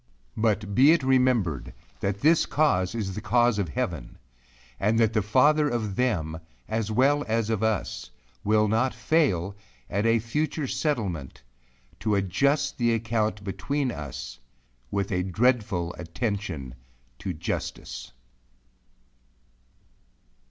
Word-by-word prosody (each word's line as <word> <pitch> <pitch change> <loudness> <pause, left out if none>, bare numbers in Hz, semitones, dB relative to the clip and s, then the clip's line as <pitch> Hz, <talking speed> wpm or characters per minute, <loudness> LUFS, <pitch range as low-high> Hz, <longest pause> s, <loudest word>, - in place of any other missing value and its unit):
But 110 -2 0
be 140 +8 +7
it 165 -5 +1
remembered, 115 - +1 0.2
that 100 0 -2
this 160 +2 +4
cause 110 -11 +1
is 100 -4 -2
the 105 - -5
cause 120 0 +3
of 95 -5 -1
heaven; - - -4 0.6
and 105 +3 +2
that 110 -1 +3
the 110 - +2
father 145 +8 +4
of 110 -6 -2
them 85 -11 0 0.3
as 110 -1 -2
well 135 +6 +3
as 115 0 0
of 110 - 0
us, 100 - -1 0.3
will 105 +1 +3
not 115 +5 +1
fail, 100 - +1 0.4
at 100 +3 +1
a 115 0 +4
future 150 +7 -2
settlement, 100 - -2 0.6
to 105 -1 +1
adjust 140 +10 +1
the 120 -1 +3
account 110 -2 -1
between 130 +7 -2
us, 65 - -7 0.5
with 100 +5 -2
a 90 -1 +1
dreadful 95 -3 +1
attention 90 - -3 0.5
to 95 - -3
justice. 80 - -5
110 Hz, 125 wpm, -26 LUFS, 95-125 Hz, 0.6 s, be